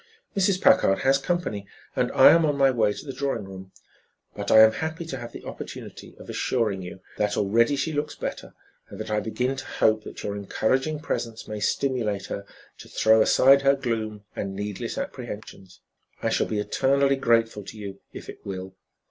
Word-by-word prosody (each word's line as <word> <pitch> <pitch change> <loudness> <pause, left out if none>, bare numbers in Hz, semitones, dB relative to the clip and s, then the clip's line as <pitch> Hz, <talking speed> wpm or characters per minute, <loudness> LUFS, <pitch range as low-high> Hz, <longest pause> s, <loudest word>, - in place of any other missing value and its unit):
"Mrs. 195 -1 +2
Packard 95 - +4
has 135 +1 +4
company 135 - -2 0.3
and - - 0
I - - +8
am 165 0 +5
on 145 -2 +1
my 135 -1 +5
way 110 -4 +2
to 105 - -8
the 135 - -6
drawing 135 -4 -2
room, 95 -1 -10 0.6
but 100 0 -4
I 110 - +8
am 110 0 +8
happy 160 +6 -4
to 140 -5 -5
have 120 -1 -8
the - - -10
opportunity - - -9
of - - -13
assuring 110 -6 -1
you 90 +1 -9 0.2
that 105 -1 0
already 115 +7 +3
she 140 +4 -2
looks 150 0 -2
better, - - -6 0.3
and - - -10
that - - -5
I 105 - +2
begin 125 +5 -2
to 135 - -6
hope 110 0 +1
that - - -8
your 100 - -3
encouraging 130 +9 -1
presence 115 -7 -4
may 105 -1 -5
stimulate 110 -3 -1
her 100 0 -6 0.3
to - - -12
throw 110 0 +4
aside 135 +5 +6
her 140 0 +4
gloom 110 -5 -3
and 95 -1 -4
needless 105 0 -4
apprehensions. 95 -1 -7 0.4
I - - 0
shall - - +1
be 110 - -2
eternally 135 +6 +2
grateful 115 -5 +2
to 110 - -9
you 100 -2 -7
if - - -10
it - - -10
will. 95 -1 -6
115 Hz, 190 wpm, -25 LUFS, 105-135 Hz, 0.6 s, I